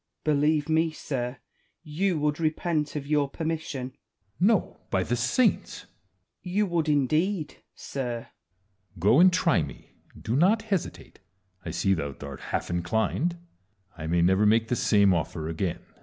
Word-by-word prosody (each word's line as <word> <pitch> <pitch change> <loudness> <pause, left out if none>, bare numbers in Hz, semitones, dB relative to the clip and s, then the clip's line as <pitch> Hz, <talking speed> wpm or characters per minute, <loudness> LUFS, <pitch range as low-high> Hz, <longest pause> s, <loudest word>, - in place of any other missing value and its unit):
Wallace. 155 -1 +3
Believe 150 0 +2
me, 160 +1 +2
sir, 130 -5 -4 0.5
you 170 +3 0
would 150 0 0
repent 155 -1 -1
of 145 -2 -3
your 145 -1 +1
per 160 - -6
mission. 155 -5 -3
Edward. 130 - -30 0.4
No, 205 +2 +2
by 95 -1 +1
the 120 - -1
saints! 130 - +1
Wallace. - - -28 0.5
You 195 +4 0
would 170 -4 0
indeed, 155 +5 +1 0.2
sir. 130 -3 -4
Edward. 95 -4 -14
Go, 105 - +5
and 185 +1 +7
try 175 - +2
me; 70 -2 -8 0.3
do 115 - -2
not 190 +10 +3
hesitate: 200 -6 -4 0.4
I - - -5
see 90 +4 +1
thou 70 -6 -3
art - - -8
half - - -2
inclined; 110 - 0 0.6
I 80 -1 -6
may 85 +1 +2
never 95 +4 +4
make 115 +1 +3
the 125 - +1
same 100 -4 +4
ofier 80 -2 -2
again. 80 +2 -2
140 Hz, 160 wpm, -27 LUFS, 95-165 Hz, 0.6 s, and